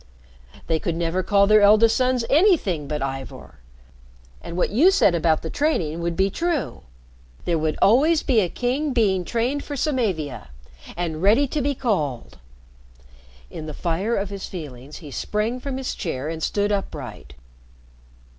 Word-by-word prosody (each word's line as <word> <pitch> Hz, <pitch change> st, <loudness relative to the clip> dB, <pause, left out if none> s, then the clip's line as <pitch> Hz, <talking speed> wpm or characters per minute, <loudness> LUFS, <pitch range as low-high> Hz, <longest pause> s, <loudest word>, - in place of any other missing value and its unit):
They 160 Hz, -1 st, 0 dB
could 165 Hz, -, -2 dB
never 170 Hz, +2 st, -1 dB
call 200 Hz, +1 st, +3 dB
their 215 Hz, +1 st, +5 dB
eldest 215 Hz, +2 st, +5 dB
sons 255 Hz, -2 st, +1 dB
anything 280 Hz, -, +2 dB
but 150 Hz, -1 st, -3 dB
Ivor. 135 Hz, -, -7 dB, 0.8 s
And 170 Hz, -, -7 dB
what 180 Hz, -, +1 dB
you 285 Hz, -, +5 dB
said 385 Hz, -, +4 dB
about 165 Hz, -2 st, +1 dB
the 160 Hz, -, -5 dB
training 175 Hz, -, 0 dB
would 170 Hz, 0 st, -2 dB
be 195 Hz, +2 st, +1 dB
true. 335 Hz, -, -2 dB, 0.6 s
There 170 Hz, -2 st, +1 dB
would 155 Hz, 0 st, -1 dB
always 300 Hz, +10 st, +4 dB
be 250 Hz, -6 st, +3 dB
a 185 Hz, -4 st, +1 dB
king 260 Hz, -, -1 dB
being 195 Hz, -6 st, +2 dB
trained 245 Hz, +8 st, -1 dB
for 290 Hz, -, -6 dB
Samavia, 190 Hz, -, -2 dB, 0.5 s
and 165 Hz, -3 st, -3 dB
ready 215 Hz, +9 st, +4 dB
to 300 Hz, -, -1 dB
be 285 Hz, +1 st, 0 dB
called." 145 Hz, -, -2 dB, 1.1 s
In 155 Hz, -, -7 dB
the 155 Hz, -, -6 dB
fire 185 Hz, +7 st, -1 dB
of 200 Hz, 0 st, -2 dB
his 195 Hz, -1 st, -6 dB
feelings 145 Hz, -5 st, -9 dB
he 145 Hz, -, -9 dB
sprang 215 Hz, -, -2 dB
from 270 Hz, 0 st, -5 dB
his 265 Hz, -1 st, -3 dB
chair 150 Hz, -3 st, -4 dB
and 160 Hz, 0 st, -5 dB
stood 205 Hz, +5 st, 0 dB
upright. 130 Hz, -, -5 dB
195 Hz, 160 wpm, -23 LUFS, 160-250 Hz, 1.1 s, their